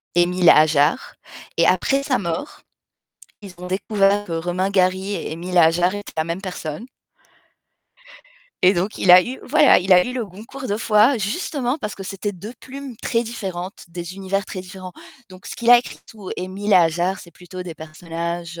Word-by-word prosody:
Émile 175 +1 +2
Émile 175 - +6
Ajar 155 - +3 0.4
et - - +4
après 275 0 +2
sa 270 -3 0
mort, 170 - -5 0.8
ils 195 -3 -11
ont 180 +1 -8
découvert 200 +1 +1
que 170 - -6
Romain 175 +3 -1
Gary 190 +1 +1
et - - -5
Émile 170 +3 -6
Émile - - +4
Ajar 175 +3 +4
étaient 205 - -8
la 160 - +2
même 170 +3 -4
personne 180 -1 -6 1.8
et 185 - +6
donc 190 +4 -2
il 185 - +3
a 180 +1 +9
eu 255 +5 -6
voilà, 295 +2 +5
il 185 +1 +1
a 180 0 +6
eu 250 - -5
le 250 -2 -3
Goncourt 220 +8 -10
2 205 -2 -2
fois 225 +3 +3
justement 250 - -2
parce 210 -7 -5
que 195 - -9
c'était 200 +2 -4
2 205 +5 -9
plumes 270 -2 -9
très 230 +1 -1
différentes, 195 -5 -6
des 175 +1 -7
univers 195 +1 -2
très 185 - -7
différents. 185 0 -10 0.4
Donc 185 +1 -14
ce - - -6
qu'il 235 0 +1
a 245 - +10
écrit 245 - -7
tout 210 -4 -11
Émile 185 +2 -6
Émile 205 -1 +3
Ajar, 175 +2 +2
c'est 170 - -14
plutôt 180 +2 -10
des 175 -2 -8
personnages 170 +2 -6
185 Hz, 190 wpm, -21 LUFS, 175-210 Hz, 1.8 s, a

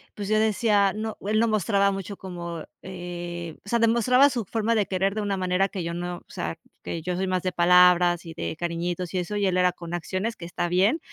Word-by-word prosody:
pues, 205 -1 -5
yo 215 +1 +2
decía 210 -2 +3
no, 220 +1 -4
él 215 +1 +2
no 230 - +3
mostraba 200 -1 +2
mucho 195 +1 -5
como, 170 -3 -6 0.2
eh, 175 -2 -6
o 200 - -11
sea, 235 - +2
demostraba 235 +4 +4
su 235 -2 -2
forma 225 +3 0
de 210 -4 +1
querer, 195 +1 0
de 215 - -2
una 200 -1 -1
manera 185 +1 +1
que 185 -3 -4
yo 170 0 -3
no, 175 0 -4
o - - -16
sea, - - -4 0.3
que 165 -2 -5
yo 180 0 -2
soy 190 +1 -1
más 185 -1 -1
de 185 - 0
palabras 175 0 +5
y 165 - -8
de 160 - -4
cariñitos 175 +1 -3
y 185 - 0
eso. 195 +4 -4
Y 205 -1 +1
él, 185 -1 +1
era 180 0 +4
con 170 0 -9
acciones, 185 +6 -2
que 170 - -9
está 175 0 -2
bien, 195 - +2
185 Hz, 235 wpm, -25 LUFS, 175-210 Hz, 0.3 s, palabras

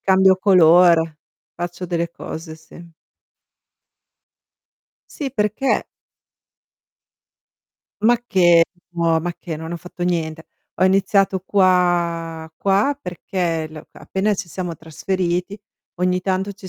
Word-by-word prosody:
cambio 190 0 +4
colore, 170 -4 +5 0.4
faccio 175 +1 -5
delle 170 -1 -2
cose, 160 -1 -8
sì. 170 +2 -15 2.2
Sì, 280 -3 -5
perché? 215 +3 0 2.2
Macché, 205 -8 +4 0.3
no, 170 -2 +1
ma 175 +2 -3
che, 165 -4 -6
non 160 +2 -7
ho - - -3
fatto 175 +1 -7
niente. 160 -2 -2 0.4
Ho - - +5
iniziato 195 0 +2
qua 175 -4 +1
qua 200 +9 +1
perché 175 - -3
l 155 0 -10
c - - -24
appena 200 +2 -1
ci 185 - -6
siamo 175 -1 -5
trasferiti 180 +4 -3 0.4
ogni 180 0 +1
tanto 190 +1 -1
ci 190 -1 -11
180 Hz, 110 wpm, -20 LUFS, 165-190 Hz, 2.2 s, colore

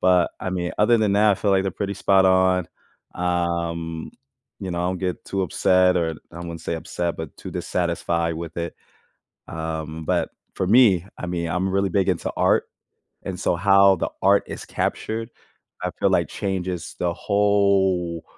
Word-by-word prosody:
but, 90 -2 +4
I 95 - -3
mean, 90 -1 -2
other 115 +3 +5
than 105 -2 +2
that, 105 +1 +5
I - - +2
feel 100 +1 0
like 95 -1 +3
they're 95 - 0
pretty 100 0 -3
spot 95 0 +3
on. 95 -1 +3 0.5
Um, 85 -2 -2 0.5
you 95 - -4
know, 85 - -3
I 90 +1 0
don't 95 - -2
get 90 -1 -3
too 100 - -2
upset, 90 +1 +3
or 85 -2 +1 0.2
I 85 - -9
wouldn't 85 -2 -6
say 85 - -3
upset, 85 +1 -3
but 80 -2 -7
too - - -8
dissatisfied 85 -1 -1
with 85 0 -7
it. 85 -1 -4 0.7
Um, 80 -1 -5
but, - - 0 0.2
for 95 - -1
me, 100 -5 +5
I - - -5
mean, 85 -1 -2
I'm 90 +3 -1
really 100 0 +1
big 95 +1 +1
into 85 - -2
art, - - +3 0.6
and - - -5
so 85 - +1
how 100 +1 +5
the - - -2
art 100 +1 +5
is - - -7
captured, 115 +1 -3 0.5
I - - -1
feel - - +3
like - - +2
changes 95 -3 -3
the 85 -1 0
whole 100 -4 +1
90 Hz, 180 wpm, -23 LUFS, 85-95 Hz, 0.7 s, other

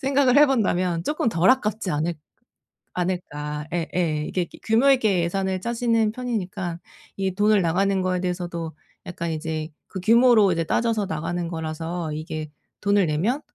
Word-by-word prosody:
생각을 270 -1 +3
해본다면 185 - +3
조금 300 -6 0
덜 170 +3 +2
아깝지 215 -6 0
않을 160 +4 -1 0.8
않을까. 150 -5 -3
예예. 165 -3 -1
이게 180 - -1
규 - - -15
규모 230 +5 +4
있게 215 -9 +3
예산을 190 +1 -1
짜지는 230 -2 +1
편이니까 195 -8 -3 0.4
이 190 -1 -1
돈을 205 -1 +3
나가는 190 +3 +1
거에 185 -1 0
대해서도 175 -3 -3 0.3
약간 170 -1 -4
이제 155 0 -4 0.2
그 190 - -6
규모로 225 -1 +5
이제 165 -1 0
따져서 220 +3 0
나가는 165 +2 -3
거라서 160 0 -4
이게 155 0 -5 0.3
'돈을 200 -2 +3
내면 195 - 0
185 Hz, 330 characters per minute, -24 LUFS, 165-220 Hz, 0.8 s, 규모로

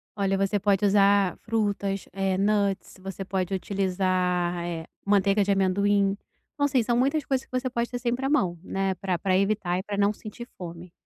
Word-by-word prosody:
Olha, 195 -2 +1
você 195 +1 +1
pode 200 0 +2
usar 200 -2 +4
frutas, 205 -3 -1
eh, 195 -1 0
nuts, 200 -1 0
você 195 0 -6
pode 185 0 -2
utilizar, 185 -2 0
eh, 170 -2 -4 0.2
manteiga 200 0 +3
de 200 - 0
amendoim. 195 +1 +2 0.4
Então, 285 -1 +1
assim, 265 -4 +2
são 240 +1 +1
muitas 275 +5 +1
coisas 265 -1 -1
que - - -43
você 255 - -3
pode 235 -1 -2
ter 245 - -3
sempre 245 +1 -2
à 270 - +1
mão, 185 - +1
né, 195 0 -1
pra 185 -1 -2
pra 185 +2 +1
evitar 195 -2 +1
e - - -5
pra 205 0 -4
não 205 +1 +3
sentir 225 +3 -9
fome. 170 0 -9
195 Hz, 190 wpm, -26 LUFS, 185-210 Hz, 0.4 s, usar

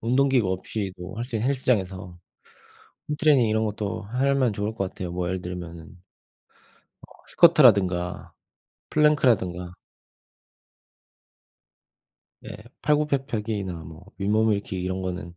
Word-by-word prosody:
뭐 115 - -3
운동기구 130 -5 +3
없이도 95 -1 -5
할 115 - -3
수 120 -3 -4
있는 115 +5 0
헬스장에서 95 -9 -1 0.9
홈트레이닝 150 -4 +3
이런 110 +1 +1
것도 105 0 -4
하면 130 +2 +1
좋을 105 +2 -3
것 95 -3 -2
같아요. 90 -2 -6
뭐 90 0 -2
예를 95 0 -3
들면은 85 -2 -7 1.2
어 - - -28 0.2
스쿼트라든가 100 - +4 0.6
플랭크라든가 115 - +2 2.7
예. - - -9 0.3
팔굽혀펴기나 120 -10 -1
뭐 80 +3 -12
윗몸일으키기 105 -2 0
이런 95 0 -3
거는 90 -2 -5
105 Hz, 275 characters per minute, -25 LUFS, 90-125 Hz, 2.7 s, 스쿼트라든가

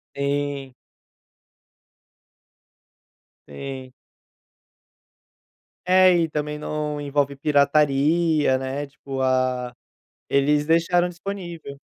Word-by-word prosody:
Sim. 140 -1 -2 2.7
Sim. 130 - -8 1.9
É, 185 0 +6
e 165 -1 +1
também, 150 0 -3
não 150 0 -4
envolve 140 -1 -1
pirataria, 150 +1 +2
né, 135 +2 -4
tipo, 135 -1 -7
ah, 130 -1 0 0.6
eles 145 +2 +2
deixaram 170 +2 +2
disponível. 175 -5 -7
145 Hz, 70 wpm, -23 LUFS, 135-160 Hz, 2.7 s, É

